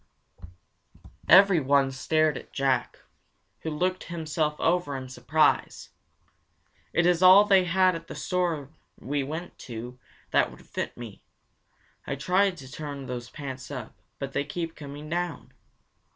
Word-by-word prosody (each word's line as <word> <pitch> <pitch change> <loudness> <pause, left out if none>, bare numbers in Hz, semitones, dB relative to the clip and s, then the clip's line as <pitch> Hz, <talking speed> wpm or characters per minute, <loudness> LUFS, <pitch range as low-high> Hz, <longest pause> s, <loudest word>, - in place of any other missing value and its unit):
Everyone 150 -8 +6
stared 155 +3 +1
at - - -9
Jack, 135 -3 0 0.6
who 160 - -4
looked 180 +4 -1
himself 155 -2 -2
over 170 -5 +1
in 130 -1 -7
surprise. 130 +5 +1 1.0
"It 170 - +2
is 175 0 +3
all 190 +3 +8
they 195 -3 +5
had 185 +1 +3
at 165 -1 -7
that - - -8
store 170 -6 -2 0.3
we 145 +2 -2
went 160 +6 -6
to 120 +2 -7 0.3
that - - +3
would - - -15
fit - - -5
me. 115 -4 -9 0.9
I 140 - -2
try 185 +8 +2
to 140 -8 -10
turn 145 -2 -6
those 125 -1 -6
pants 135 -3 -7
up, 125 -7 -7 0.2
but 135 -1 -5
they - - 0
keep 165 +3 -5
coming 145 0 -9
down." 175 +1 -4
150 Hz, 135 wpm, -27 LUFS, 135-175 Hz, 1.0 s, all